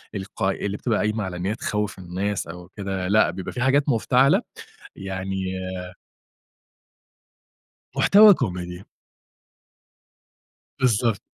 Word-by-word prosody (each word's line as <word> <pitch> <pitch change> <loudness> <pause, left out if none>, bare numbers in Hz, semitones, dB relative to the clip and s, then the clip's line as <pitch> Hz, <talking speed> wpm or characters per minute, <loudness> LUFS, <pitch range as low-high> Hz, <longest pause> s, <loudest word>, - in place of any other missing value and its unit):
الق 95 -1 -6
اللي 100 +1 -1
بتبقى 115 -1 0
قايمة 110 0 0
على 95 -2 -5
إن 90 - -4
هي 105 +3 -1
تخوّف 105 -3 -3
الناس 95 +2 -3
أو 90 +1 -9
كده، 95 -2 -3
لأ 105 +3 +4
بيبقى 95 0 -6
في 125 - -4
حاجات 140 +3 +3
مفتعلة. 130 +2 +3 0.5
يعني 95 0 -4 2.5
محتوى 210 +1 +7
Comedy. 90 - -4 2.0
بالضبط. 115 -3 +2
100 Hz, 105 wpm, -23 LUFS, 95-115 Hz, 2.5 s, محتوى